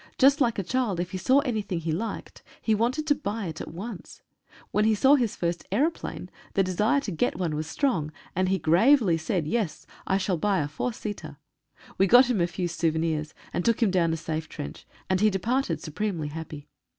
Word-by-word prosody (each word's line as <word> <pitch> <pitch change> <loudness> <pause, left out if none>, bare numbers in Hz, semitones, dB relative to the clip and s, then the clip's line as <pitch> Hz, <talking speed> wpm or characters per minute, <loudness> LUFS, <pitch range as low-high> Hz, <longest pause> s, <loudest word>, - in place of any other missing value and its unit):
Just 280 +2 +5
like 235 -3 +2
a 195 - -1
child, 225 -3 -1
if 175 +1 -3
he 185 - -4
saw 260 +9 +4
anything 215 - -2
he 165 0 -2
liked 215 +8 -4 0.2
he 220 - +1
wanted 245 +8 0
to 300 - +4
buy 225 -7 -4
it 160 -2 -5
at - - -6
once. 195 +4 -8 0.5
When 210 - +2
he 220 0 +4
saw 265 +7 +5
his 245 -7 +2
first 170 0 -2
aeroplane 295 - -1 0.2
the 195 - +4
desire 210 +9 +2
to 220 - -4
get 160 - 0
one 170 -4 -1
was 155 0 -3
strong, 160 - 0 0.2
and 185 +1 +1
he 190 - +2
gravely 185 - +4
said, 170 0 -1
"Yes 165 -3 -2 0.2
I 190 - +2
shall 190 -2 0
buy 195 +1 +1
a 145 - -1
four 150 +12 -3
seater!" 215 -2 -7 0.6
We 195 - +5
got 250 +4 +7
him 210 -7 +1
a 170 - +3
few 175 +1 -3
souvenirs, 160 -2 -1 0.2
and 175 - -1
took 230 +2 +2
him 205 - +3
down 170 -3 +2
a 165 - -1
safe 160 0 -4
trench, 70 - -8 0.2
and 185 0 +1
he 215 - +5
departed 235 +8 -1
supremely 165 -2 -3
happy. 155 -1 -8
190 Hz, 210 wpm, -26 LUFS, 165-230 Hz, 0.6 s, got